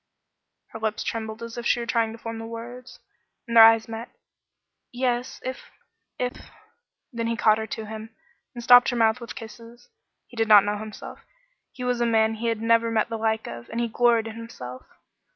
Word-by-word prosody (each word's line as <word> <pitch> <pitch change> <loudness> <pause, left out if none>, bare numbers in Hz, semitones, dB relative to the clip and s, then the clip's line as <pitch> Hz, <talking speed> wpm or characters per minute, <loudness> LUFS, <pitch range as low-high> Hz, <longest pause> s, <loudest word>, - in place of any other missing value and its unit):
Her 225 - -9
lips 215 -1 -2
trembled 220 0 -5
as 230 +1 -7
if 235 - -7
she - - +2
were 235 - -3
trying 230 -2 0
to 225 - -9
form 230 -1 -6
the 225 - -6
words, 240 +2 -9 0.5
and 235 - -4
their 225 - +11
eyes 225 0 +6
met. 225 +1 -7 0.8
"Yes 245 0 -2
if 260 0 -6 0.5
if 250 0 -4 0.3
" 475 - -55
Then 230 -1 -2
he 230 0 -1
caught 215 -1 +4
her 220 - -4
to 220 0 -6
him, 220 +1 -8 0.5
and 240 - -7
stopped 245 0 +7
her 245 - -2
mouth 225 +1 +2
with 235 - -8
kisses. 230 +1 -12 0.4
He - - -17
did 225 -1 0
not 205 -2 +8
know 205 0 -2
himself. 215 0 -9 0.5
He 250 - -8
was 250 -1 0
a 235 - +2
man 220 -1 +3
he 225 +1 -4
had 225 -1 -1
never 230 0 +3
met 225 0 0
the 225 - -3
like 220 0 0
of, 120 0 -9
and 230 - -4
he 235 - 0
gloried 235 0 +3
in 225 -1 -7
himself. 130 - -9
230 Hz, 205 wpm, -25 LUFS, 220-235 Hz, 0.8 s, their